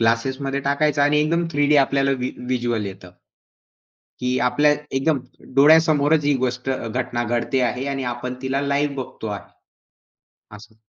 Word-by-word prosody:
ग्लासेसमध्ये 130 +5 0
टाकायचा 145 +1 +1
आणि 150 +1 +3
एकदम 170 +3 +1
थ्रीडी 145 +1 +3
आपल्याला 135 0 +2
व्ही 125 0 -2
व्हिज्युअल 120 -4 -2
येतं. 95 -2 -9 1.1
की 125 0 0
आपल्या 145 +4 +3 0.3
एकदम 140 +1 +1 0.4
डोळ्यासमोरच 155 0 +5
ही 145 0 +3
गोष्ट 125 +1 -3
अ, 130 -3 -3
घटना 120 0 -2
घडते 120 +3 -1
आहे 125 +2 -5
आणि 135 -1 -3
आपण 125 +1 -5
तिला 135 +1 -1
लाइव 140 0 0
बघतो 130 -4 -6
आहे. 100 -1 -5 1.1
असं. 105 +1 -16
135 Hz, 145 wpm, -22 LUFS, 120-145 Hz, 1.1 s, डोळ्यासमोरच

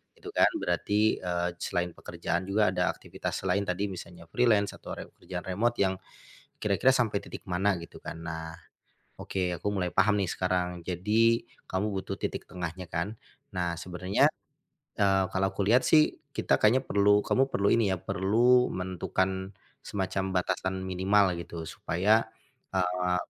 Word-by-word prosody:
gitu 410 - -9
kan. - - +5 0.2
Berarti, 105 +1 +1
eee, 90 -1 -1
selain 90 0 -1
pekerjaan 90 +3 -3
juga 105 +2 +3
ada - - +1
aktivitas - - -4
selain 100 0 +1
tadi 95 +2 -1
misalnya 85 -2 -10
freelance 110 -5 +3
atau - - -7
re - - -6
pekerjaan - - -7
remote 115 +6 0
yang, 95 -1 +1 0.6
kira-kira 105 +6 +3
sampai 110 -5 +1
titik - - -9
mana 95 +3 +2
gitu 85 0 -10
kan. - - -7
Nah, 80 0 -5 0.6
oke 90 -2 -2
aku 105 - -4
mulai 95 -3 0
paham 105 -1 +3
nih 95 -3 0
sekarang. 90 -1 -1
Jadi, 110 +7 +2 0.2
kamu 105 +3 -1
butuh 95 -1 -3
titik - - -4
tengahnya 90 0 -5
kan? 95 +6 -3 0.3
Nah 90 -2 -1
sebenarnya, 90 +3 +1 0.7
eee, 95 -1 +4
kalau 95 +1 +1
aku 100 0 -2
lihat 120 +6 +4
sih, 155 -1 +4 0.2
kita - - +2
kayaknya 125 +5 +4
perlu 105 -1 +3
kamu 135 +1 +2
perlu 100 -5 +2
ini 115 -3 +3
ya 95 - +1
perlu 110 +8 +3
menentukan, 95 +1 -2 0.3
semacam 95 -1 -2
batasan 95 +1 -1
minimal 95 +1 +3
gitu 85 -1 -7
supaya, 105 +8 +1 0.5
eee 90 0 +1
95 Hz, 150 wpm, -29 LUFS, 90-105 Hz, 0.7 s, kan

